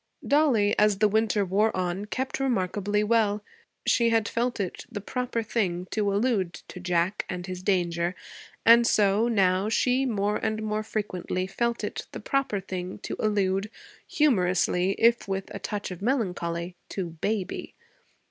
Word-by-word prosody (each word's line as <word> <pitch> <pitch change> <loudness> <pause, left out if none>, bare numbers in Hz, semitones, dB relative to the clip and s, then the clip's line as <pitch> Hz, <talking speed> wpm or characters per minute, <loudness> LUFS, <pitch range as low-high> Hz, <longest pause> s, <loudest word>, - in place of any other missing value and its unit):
Dollie, 265 -9 +3
as 210 -2 +4
the 215 +1 +4
winter 215 -1 +2
wore 200 +3 +1
on, 185 +2 -2
kept 260 +6 -3
remarkably 210 -4 0
well. 210 -2 +2 0.4
She 235 -1 +3
had 225 -2 +2
felt 240 0 -1
it 190 -3 -3
the 205 - -4
proper 245 +2 -2
thing 185 -6 -1
to 205 -2 +1
allude 200 -4 +1 0.2
to - - -8
Jack 180 +2 0
and 180 -1 -4
his 185 -1 -6
danger; 175 -2 0 0.5
and 235 +1 +7
so, 205 +2 +3
now, 195 -3 +2
she 255 +4 +2
more 210 -2 0
and 220 0 -2
more 215 0 -1
frequently 185 -4 -3
felt 235 +5 -1
it - - -4
the - - -5
proper 275 -7 0
thing 185 -1 -5
to - - -4
allude, 200 -1 +1 0.4
humorously, 185 - +2
if 230 -1 +3
with 195 0 -3
a - - -5
touch 205 -2 -4
of 180 - -7
melancholy, 180 -7 -1
to 180 -4 -4
'baby.' 190 +4 -3
205 Hz, 155 wpm, -27 LUFS, 185-225 Hz, 0.5 s, and